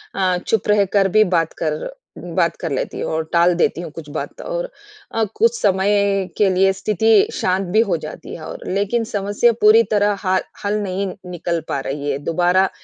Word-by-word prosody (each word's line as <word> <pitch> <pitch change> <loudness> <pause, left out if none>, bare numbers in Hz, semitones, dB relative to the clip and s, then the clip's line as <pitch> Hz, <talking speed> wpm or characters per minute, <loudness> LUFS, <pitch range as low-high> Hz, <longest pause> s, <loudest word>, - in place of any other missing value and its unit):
अ, 185 -2 +1
चुप 220 -3 0
रहकर 200 -1 +3
भी 215 - +7
बात 165 -1 0
कर 155 - -2 0.3
बात - - -1
कर - - -4
लेती - - -3
हूँ - - -3
और 160 0 0
टाल 170 +1 +4
देती 170 0 +1
हूँ 170 - -6
कुछ 150 -1 -10
बात। 155 - -6
और - - -4 0.4
अ, 225 - 0
कुछ 465 +1 +2
समय 195 0 +2
के 205 -2 +4
लिए 190 +1 +3
स्थिति 210 +2 +3
शांत 185 0 0
भी 215 - +3
हो 170 - +1
जाती 155 -1 -8
है - - -10
और, - - -7
लेकिन 205 +5 0
समस्या 205 +1 +1
पूरी 220 +2 +7
तरह 205 -1 +3
हाल 185 -1 +1 0.2
हल 205 +1 0
नहीं 195 +1 -2 0.2
निकल 170 -1 -2
पा - - -2
रही 140 +2 -4
है। 135 - -1
दोबारा 180 +4 +2
195 Hz, 190 wpm, -20 LUFS, 175-210 Hz, 0.4 s, भी